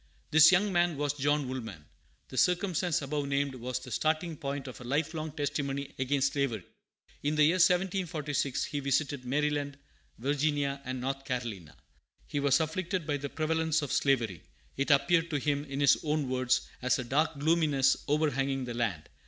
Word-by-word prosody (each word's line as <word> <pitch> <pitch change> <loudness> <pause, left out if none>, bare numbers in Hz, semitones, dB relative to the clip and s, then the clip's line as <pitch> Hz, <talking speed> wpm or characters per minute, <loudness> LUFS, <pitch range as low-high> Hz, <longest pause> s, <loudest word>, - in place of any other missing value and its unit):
This 160 +1 +8
young 190 +2 +3
man 175 -3 +2
was 145 -1 0
John 145 0 0
Woolman. 110 - -6 0.4
The - - -9
circumstance 180 -3 +1
above 145 0 -2
named 140 0 0
was 125 0 -4
the 130 0 -9
starting 160 +6 0
point 140 -1 -4
of 130 - -9
a - - -7
life 145 +6 -1
long 155 -1 -4
testimony 140 -2 -3
against 135 +1 +1
slavery. 135 -9 -1 0.6
In 150 +1 0
the 150 - +4
year 165 +5 +4
1746 170 -7 +1
he 145 - -3
visited 140 -1 -1
Maryland, 145 +1 -1 0.4
Virginia, 140 +1 0
and 130 0 -4
North 135 +1 -3
Carolina. 120 - -5 0.5
He 145 - -3
was 140 0 +3
afflicted 170 +2 -2
by 145 -2 -1
the 140 0 -5
prevalence 160 0 0
of 145 - -4
slavery. 115 - +1 0.3
It 140 +2 -1
appeared 165 +4 +3
to 150 - 0
him, 145 +1 -1
in 140 -1 -5
his 140 - +5
own 150 -2 0
words, 130 0 +1 0.2
"as 125 0 +2
a 125 - -3
dark 145 +5 0
gloominess 145 -3 +3
overhanging 140 -3 0
the 120 - -5
land." 115 -10 -2
145 Hz, 170 wpm, -30 LUFS, 135-155 Hz, 0.6 s, This